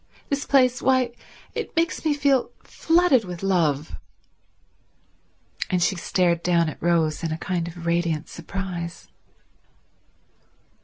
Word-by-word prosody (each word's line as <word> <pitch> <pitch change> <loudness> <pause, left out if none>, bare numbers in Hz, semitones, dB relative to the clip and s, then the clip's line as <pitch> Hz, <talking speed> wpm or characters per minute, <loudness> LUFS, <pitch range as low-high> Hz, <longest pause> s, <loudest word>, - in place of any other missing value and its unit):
This 280 0 -2
place—why, 255 -1 +3 0.4
it - - -5
makes 330 +1 0
me 310 -2 +2
feel 280 -3 +2
flooded 330 -7 +3
with 180 -1 -7
love." 150 - 0 1.7
And 180 -1 +1
she 190 - +2
stared 175 -1 +1
down 170 -2 +2
at - - -10
Rose 165 -2 +1
in 165 - -1
a 160 - -2
kind 170 -1 -2
of 170 0 -9
radiant 170 -2 0
surprise. 175 0 -6
180 Hz, 115 wpm, -24 LUFS, 170-255 Hz, 1.7 s, place—why